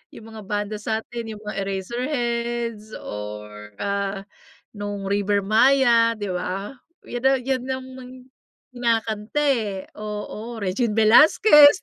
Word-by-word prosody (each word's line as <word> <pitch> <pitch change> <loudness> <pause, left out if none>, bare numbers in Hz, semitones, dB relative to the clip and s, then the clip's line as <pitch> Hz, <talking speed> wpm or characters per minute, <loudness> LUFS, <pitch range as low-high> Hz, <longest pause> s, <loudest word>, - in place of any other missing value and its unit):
Yung 225 - -11
mga 220 -1 -9
banda 205 +1 -2
sa'tin, 225 +2 -4
yung 210 - -11
mga 210 -1 -6
Eraserheads 235 +1 -3
or, 105 0 -8
ah, 200 -1 -2 0.6
nung 205 -1 -4
River 200 0 +1
Maya, 230 +2 +4
'di 205 -2 -5
ba? 185 +7 -4 0.3
'Yan, 245 0 -5
ah, 270 0 +3
'yan 260 0 -1
nga 260 0 -2
ang 260 - -11 0.8
kinakanta, 230 0 -1
eh, 235 -9 +1 0.2
oo. 215 +2 -6
Regine 205 +4 0
Velasquez. 295 - +7
220 Hz, 120 wpm, -23 LUFS, 200-240 Hz, 0.8 s, Velasquez